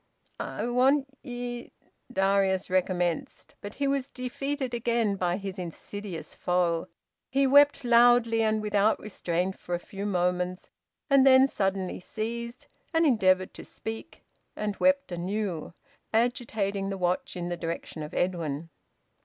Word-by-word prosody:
"I - - -3
want 260 +4 +3 0.2
ye 245 -2 -6 0.2
" - - -23
Darius 195 -2 +2
recommenced. 180 -3 -1
But 205 +1 -7
he 280 - 0
was 275 -1 0
defeated 260 +1 -3
again 235 -3 +1
by 180 -2 0
his 195 -1 -6
insidious 180 +1 -6
foe. 175 -2 0 0.4
He 275 +1 +2
wept 285 +1 +6
loudly 235 -1 +5
and 215 -1 +1
without 210 0 +2
restraint 185 -2 -2
for 175 - -3
a - - -3
few 200 +3 -6
moments, 180 -1 -1 0.4
and 275 -2 +5
then 265 0 +7
suddenly 195 -6 -1
ceased, 235 +5 -5 0.3
and 325 0 +4
endeavoured 185 -8 +3
to - - -9
speak, 225 0 -8 0.3
and 210 -1 -2
wept 280 -5 +2
anew, 180 -1 -3 0.4
agitating 220 -5 0
the 195 - -3
watch 180 +1 -1
in 175 0 -3
the 175 - -1
direction 165 -1 -5
of 150 +1 -6
Edwin. 165 -3 -2
205 Hz, 135 wpm, -28 LUFS, 180-245 Hz, 0.4 s, then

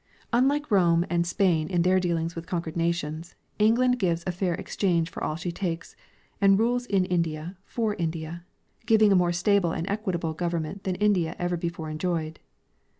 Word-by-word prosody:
Unlike 275 +3 +2
Rome 170 -3 +4
and 170 0 +1
Spain 170 -4 +2
in 175 -3 +1
their 185 +1 +4
dealings 170 -2 -1
with 165 0 -7
conquered 170 -3 -3
nations, 165 -1 -2 0.2
England 250 +4 +3
gives 170 -4 0
a 185 - 0
fair 180 -1 -1
exchange 170 -3 -1
for - - -6
all 155 - -1
she 175 +2 -4
takes, 170 -1 -4 0.5
and 195 -1 +6
rules 245 +3 +1
in 195 -4 +2
India 170 -1 -2
for 225 -3 -1
India, 165 -1 -4 0.4
giving 215 -2 +5
a - - +5
more 175 -1 +3
stable 180 0 +2
and 165 +3 -3
equitable 185 -6 -2
gov 175 +1 -2
ernment 160 +5 -6
than 185 -1 0
India 190 -5 +1
ever 175 0 -1
before 170 -2 -4
enjoyed. 160 -1 -2
175 Hz, 175 wpm, -26 LUFS, 165-195 Hz, 0.5 s, and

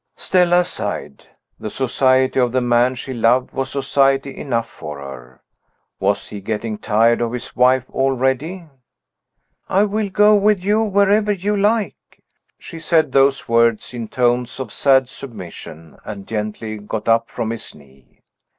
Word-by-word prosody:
Stella 180 -1 +2
sighed. 180 - -6 0.3
The 110 - -5
society 130 +2 +1
of 125 -2 +2
the 130 - +3
man 120 +1 +2
she 130 +1 -6
loved 120 +2 +2
was 135 0 -3
society 135 0 +1
enough 115 -5 -2
for 75 -1 -9
her. 65 -2 -11 0.6
Was - - -1
he 105 - -8
getting 110 +1 -4
tired 115 +3 +2
of 120 0 -1
his 125 0 -7
wife 125 +1 +3
already? 135 +7 -1 1.0
"I 195 +2 +3
will 210 0 -1
go 210 +2 +4
with 205 -2 +2
you 210 +3 +2
wherever 205 0 +2
you 205 +1 -1
like." 205 -3 -1 0.3
She 165 - -10
said 160 0 +1
those 135 0 +2
words 115 0 +2
in 115 -2 -5
tones 125 +1 0
of 125 -6 -6
sad 135 -2 +3
submission, 90 - -11
and 100 -2 -8
gently 110 0 -4
got 105 +1 -5
up 115 0 +2
from 115 -2 -3
his 115 - -8
knee. 70 -2 -22
130 Hz, 150 wpm, -19 LUFS, 115-165 Hz, 1.0 s, go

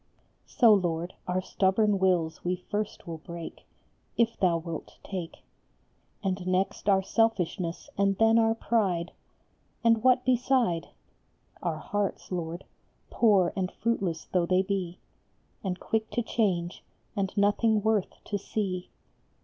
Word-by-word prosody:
So, 230 -4 +6
Lord, 175 -3 0
our 180 +1 0
stubborn 195 +2 +2
wills 175 -4 +1
we 180 +1 0 0.2
first 210 0 -3
will 165 -2 -6
break, 170 +1 -9 0.5
If 230 -1 +2
thou 175 -3 +2
wilt 165 -1 -7
take; 180 -4 -6 0.8
And 185 -1 -2
next 185 +2 0
our 190 -1 +4
selfishness, 190 -6 0
and 195 -1 +2
then 225 +1 +5
our 225 0 +3
pride, 190 -7 0 0.7
And 230 -1 +4
what 255 0 +4
beside? 250 -8 +2 0.7
Our 170 -3 -1
hearts, 205 +4 -3
Lord, 170 0 -3 0.5
poor 200 -7 +4
and 185 -1 -1
fruitless 195 -8 -1
though 175 -2 0
they 185 +1 +3
be, 185 -3 -2 0.7
And 185 -2 -2
quick 220 -1 -1
to 240 - 0
change, 185 -7 -1 0.3
and 195 -2 -1
nothing 210 +1 +3
worth 220 -3 0
to 205 - -3
see. 190 -3 -3
190 Hz, 130 wpm, -28 LUFS, 175-220 Hz, 0.8 s, So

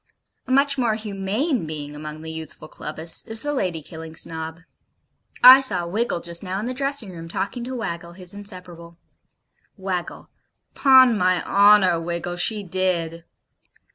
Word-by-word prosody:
A - - -5
much 280 +1 +2
more 230 -3 +1
humane 215 - -2
being 150 -1 -7
among 155 +1 -8
the 160 - -7
youthful 160 -1 -8
Clubbists 155 +2 -1
is 225 0 +1
the 290 0 -2
Lady 180 - -2
killing 160 0 -10
Snob. 160 +1 -4 0.8
I 260 +2 +10
saw 220 -10 +3
Wiggle 195 0 -2
just 170 0 -1
now 185 -1 -4
in 215 - -4
the 250 - -3
dressing 275 -5 -2
room, 165 -1 -10
talking 235 +8 -4
to 260 +1 -6
Waggle, 170 -7 -5
his 180 0 -2
inseparable. 180 -4 -6 0.8
WAGGLE. 185 -3 -5 0.5
'Pon 260 -3 +6
my 185 -2 +1
honour, 200 -4 +4
Wiggle, 170 +1 -4
she 210 +3 +1
did.' 170 -3 -2
185 Hz, 150 wpm, -22 LUFS, 165-225 Hz, 0.8 s, I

